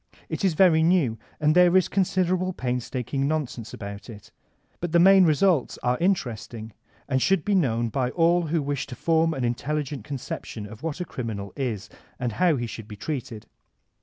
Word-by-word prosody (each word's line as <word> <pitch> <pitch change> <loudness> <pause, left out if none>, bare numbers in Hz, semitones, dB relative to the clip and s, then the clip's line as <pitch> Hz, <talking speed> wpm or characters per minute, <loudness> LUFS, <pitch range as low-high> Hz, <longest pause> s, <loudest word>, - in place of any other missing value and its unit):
It - - -4
is 185 -5 +2
very 165 -3 +5
new, 160 - +2 0.2
and 150 0 +3
there 180 +1 +6
is 185 - +3
considerable 185 -1 0
painstaking 125 +1 -2
nonsense 140 -7 -3
about 100 0 -8
it. 105 -3 -12 0.5
But 175 -1 -4
the 170 - +6
main 190 +1 +7
results 160 -2 +2
are 125 0 +1
interesting 120 - -2 0.3
and 130 -2 0
should 190 0 +2
be 205 - +1
known 120 - +1
by 125 +2 -1
all 170 +3 +2
who 155 -1 0
wish 140 -1 -2
to 125 - -8
form 165 +4 +2
an 130 - -3
intelligent 140 +1 -2
conception 120 -4 -6
of 105 +1 -11
what 165 +2 -4
a - - -2
criminal 105 - -5
is 120 -8 -3 0.3
and 120 -1 -1
how 170 +7 +2
he 120 -3 -2
should 115 -2 -8
be 105 - -8
treated. 115 -2 -5
140 Hz, 180 wpm, -25 LUFS, 120-175 Hz, 0.5 s, main